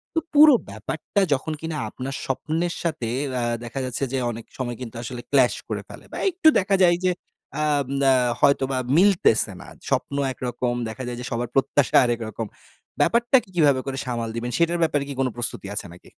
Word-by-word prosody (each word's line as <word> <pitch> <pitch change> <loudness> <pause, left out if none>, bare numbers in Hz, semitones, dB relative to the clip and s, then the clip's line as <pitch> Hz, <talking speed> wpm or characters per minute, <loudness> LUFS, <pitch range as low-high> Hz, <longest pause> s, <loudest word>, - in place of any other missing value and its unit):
তো - - +4
পুরো 300 -1 +8 0.2
ব্যাপারটা 130 - -2
যখন 145 +4 -2
কিনা 160 -1 -4
আপনার 135 +4 -6
স্বপ্নের 160 +6 -1
সাথে 155 -9 -2 0.2
অ্যা 125 -2 -1 0.2
দেখা 120 +3 -5
যাচ্ছে 125 +2 -3
যে - - +1
অনেক 115 0 -8
সময় 120 -3 -3
কিন্তু 115 -2 -7
আসলে 120 0 -6
ক্লাশ 130 -3 +4
করে - - -3
ফেলে। - - -12
বা - - -6
একটু 335 -2 +1
দেখা 195 +1 +1
যায় 175 -1 +5
যে 180 - +4 0.4
অ্যা 150 - 0 0.2
ম - - -12 0.2
আ - - +6 0.3
হয়তোবা 135 -2 +3 0.2
মিলতেছে 180 - +4
না। - - -12 0.2
স্বপ্ন 140 - -1 0.2
একরকম 125 -1 -2 0.2
দেখা 130 +4 -6
যায় 120 -1 -4
যে - - -6
সবার 120 0 -2
প্রত্যাশা 135 0 +2
আরেক 120 -1 0
রকম। 110 +1 -5 0.6
ব্যাপারটাকে 235 -2 +3
কিভাবে 145 -5 +4
করে 135 -1 -4
সামাল 115 -2 -3
দিবেন 120 +1 -3
সেটার 170 0 +2
ব্যাপারে 145 -3 +1
কি - - -3
কোনো 130 -1 +2
প্রস্তুতি 120 -4 -2
আছে - - -3
নাকি? 90 - -16
135 Hz, 190 wpm, -24 LUFS, 120-165 Hz, 0.6 s, পুরো